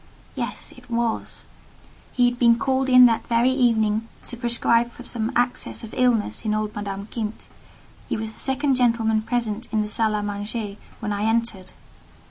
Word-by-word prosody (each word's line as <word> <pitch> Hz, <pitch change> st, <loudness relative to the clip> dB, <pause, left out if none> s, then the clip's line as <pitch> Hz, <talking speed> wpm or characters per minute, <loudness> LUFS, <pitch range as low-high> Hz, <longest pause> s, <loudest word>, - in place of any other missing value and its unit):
Yes: -, -, -5 dB
it -, -, -17 dB
was. 235 Hz, -1 st, -2 dB, 0.7 s
He 245 Hz, -1 st, +3 dB
had 245 Hz, 0 st, -2 dB
been 235 Hz, -1 st, +5 dB
called 265 Hz, +1 st, 0 dB
in 255 Hz, -1 st, +9 dB
that 230 Hz, -2 st, +2 dB
very 235 Hz, +2 st, +3 dB
evening 225 Hz, -4 st, +2 dB, 0.2 s
to -, -, -7 dB
prescribe 235 Hz, 0 st, +1 dB
for 250 Hz, -, -12 dB
some 230 Hz, -2 st, -3 dB
access 245 Hz, 0 st, 0 dB
of 225 Hz, -, -9 dB
illness 245 Hz, -4 st, +1 dB
in 215 Hz, -1 st, 0 dB
old 215 Hz, 0 st, -2 dB
Madame 200 Hz, -1 st, -4 dB
Kint; 215 Hz, -1 st, -5 dB, 0.6 s
he -, -, -1 dB
was 220 Hz, 0 st, -5 dB
the -, -, -10 dB
second 270 Hz, +1 st, +1 dB
gentleman 230 Hz, -3 st, +2 dB
present 230 Hz, 0 st, -2 dB
in 215 Hz, -1 st, +1 dB
the -, -, -4 dB
salle 215 Hz, +1 st, +1 dB
à 210 Hz, -1 st, -1 dB
manger 205 Hz, 0 st, -4 dB, 0.2 s
when 210 Hz, -1 st, -2 dB
I 205 Hz, +1 st, -1 dB
entered. 225 Hz, -4 st, -1 dB
230 Hz, 175 wpm, -23 LUFS, 215-245 Hz, 0.7 s, in